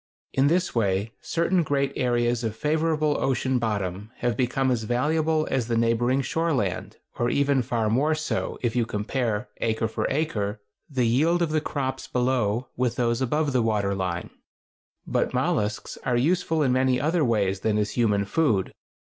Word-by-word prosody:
In 135 +1 +3
this 175 +4 +1
way 100 -1 0
certain 170 +2 +1
great 140 -3 0
areas 120 -1 +1
of 110 -1 -2
favorable 155 +2 +1
ocean 130 -1 +1
bottom 100 -3 -2
have 120 -2 -1
become 130 +2 +1
as 120 -3 0
valuable 155 +7 +1
as 130 -4 0
the 115 -1 0
neighboring 120 +3 +2
shore 165 +3 0
land, 100 -9 -2 0.2
or 120 - +2
even 140 -1 +2
far 115 -2 -1
more 140 +8 +2
so, 155 0 -2
if 120 -1 0
you 120 - +3
compare, 110 +1 -2
acre 110 0 0
for 110 - -2
acre, 110 -9 -1 0.3
the 130 -4 0
yield 160 +9 +3
of 160 - -1
the 155 0 +1
crops 135 -3 -3
below 125 -2 0
with 125 -1 0
those 120 0 0
above 145 +3 0
the 125 - +3
water 105 -3 +1
line. 90 -3 -3 0.7
But - - 0
mollusks 105 0 -1
are 125 -2 +1
useful 160 +3 +1
in 130 - +2
many 130 0 +2
other 160 +4 +1
ways 100 -6 +1
than 105 +1 0
as 105 -1 0
human 105 -4 +1
food. 105 - +1
125 Hz, 170 wpm, -25 LUFS, 110-145 Hz, 0.7 s, In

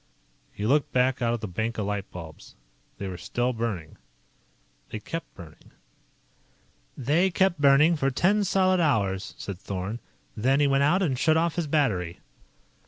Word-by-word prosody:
He 105 - -5
looked 145 +4 +2
back 130 0 +1
out 115 -1 +2
at 115 - -7
the 110 - -4
bank 110 +5 -3
of 105 - -1
light 100 -1 -3
bulbs. 80 -3 -11 0.4
They 100 - -5
were 90 -2 -6
still 120 +7 -1
burning. 110 -9 -4 0.9
They 110 - -5
kept 165 +10 -6
burning 85 -4 -14 0.7
"... - - -38
They 170 +6 +3
kept 180 -3 +1
burning 145 +4 +5
for 135 -2 +1
ten 190 +10 +2
solid 185 -1 +2
hours," 100 - 0
said 95 -3 -6
Thorn. 100 +5 -4 0.4
"Then 130 +6 +2
he 145 - +4
went 135 0 +2
out 175 +7 +3
and 135 -8 0
shut 160 -1 +3
off 165 0 +1
his 170 -2 -2
battery." 105 - 0
125 Hz, 170 wpm, -26 LUFS, 100-155 Hz, 0.9 s, burning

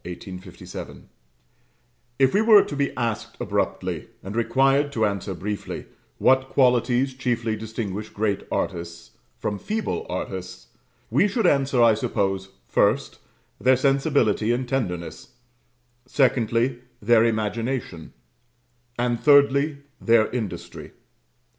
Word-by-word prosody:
_ 90 +1 -9 1.2
If 135 -1 +3
we 205 - +4
were 220 -2 +7
to 145 - -6
be 140 0 0
asked 115 -3 -3
abruptly, - - -2 0.2
and 100 +3 -7
required 135 +5 +2
to 110 -3 +1
answer 100 -2 -3
briefly, 100 +4 -5 0.3
what 130 0 +3
qualities 125 0 +2
chiefly 120 -4 -1
distinguish 110 -1 -5
great 105 -2 -1
artists 85 -2 -4 0.3
from 105 -2 -3
feeble 220 - -3
artists, - - -6 0.4
we - - +4
should 215 +1 -1
answer, 135 -6 +3
I 115 -1 +6
suppose, 95 -2 -1 0.2
first, 115 +7 +1 0.4
their 130 0 +4
sensibility 135 -5 +2
and 125 +1 -1
tenderness; 105 -3 -4 0.7
secondly, 120 -2 +1 0.2
their 115 +1 +4
imagination; 115 -4 -2 0.8
and 120 -1 0
thirdly, 140 0 +4 0.2
their 115 -2 +3
industry. 105 -8 -6
120 Hz, 110 wpm, -24 LUFS, 105-135 Hz, 1.2 s, were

